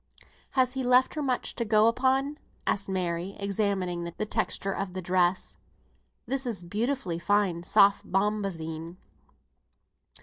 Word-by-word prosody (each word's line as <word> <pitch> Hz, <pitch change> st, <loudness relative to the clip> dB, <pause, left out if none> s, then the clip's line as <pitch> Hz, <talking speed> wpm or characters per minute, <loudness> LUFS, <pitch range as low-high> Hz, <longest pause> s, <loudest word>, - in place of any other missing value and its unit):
"Has 255 Hz, -1 st, +3 dB
he 265 Hz, -1 st, -2 dB
left 250 Hz, +1 st, +4 dB
her 305 Hz, -, -3 dB
much 260 Hz, -3 st, -1 dB
to 235 Hz, -, 0 dB
go 215 Hz, -1 st, +4 dB
upon?" 265 Hz, +4 st, +1 dB, 0.3 s
asked 200 Hz, 0 st, 0 dB
Mary, 180 Hz, 0 st, -2 dB
examining 195 Hz, -3 st, -1 dB
the 170 Hz, +5 st, -4 dB
texture 195 Hz, -1 st, -1 dB
of 195 Hz, -2 st, -4 dB
the 185 Hz, -, -3 dB
dress. 180 Hz, +1 st, +1 dB, 0.7 s
"This 270 Hz, -1 st, -1 dB
is 205 Hz, -7 st, -2 dB
beautifully 210 Hz, -1 st, -2 dB
fine 195 Hz, -2 st, +1 dB
soft 200 Hz, +2 st, +3 dB
bombazine." 180 Hz, -5 st, -2 dB
200 Hz, 130 wpm, -28 LUFS, 180-240 Hz, 0.7 s, left